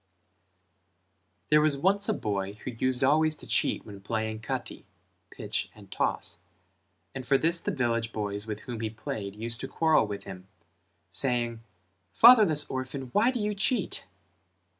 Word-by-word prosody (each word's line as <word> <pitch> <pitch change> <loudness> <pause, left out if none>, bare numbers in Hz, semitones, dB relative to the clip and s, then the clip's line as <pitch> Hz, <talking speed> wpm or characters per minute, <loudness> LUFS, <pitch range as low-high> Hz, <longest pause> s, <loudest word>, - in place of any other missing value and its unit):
There 150 0 +5
was 150 -2 +2
once 200 +6 +2
a - - +3
boy 100 -2 -3
who 105 +4 -7
used 130 +2 -1
always 155 +3 +3
to - - -8
cheat - - 0
when 100 -2 -10
playing 110 +1 -3
Kati 125 +2 -5 0.4
(pitch - - -4
and - - -16
toss) 85 - -2 0.7
and 130 - -5
for 135 +2 +3
this 165 +3 +3
the - - -2
village 115 -3 -1
boys 105 -1 -4
with 105 0 -5
whom 120 -3 -6
he 110 -1 -2
played 105 -2 -6
used 115 +2 -3
to - - -4
quarrel 160 -8 +2
with 100 -1 -6
him, 95 -1 -10 0.6
saying 120 -3 0 0.5
"Fatherless 210 -12 +7
orphan, 130 0 -5
why 225 +4 +4
do 255 -2 -2
you 210 0 -1
cheat?" 200 - 0
125 Hz, 155 wpm, -28 LUFS, 110-155 Hz, 0.7 s, Fatherless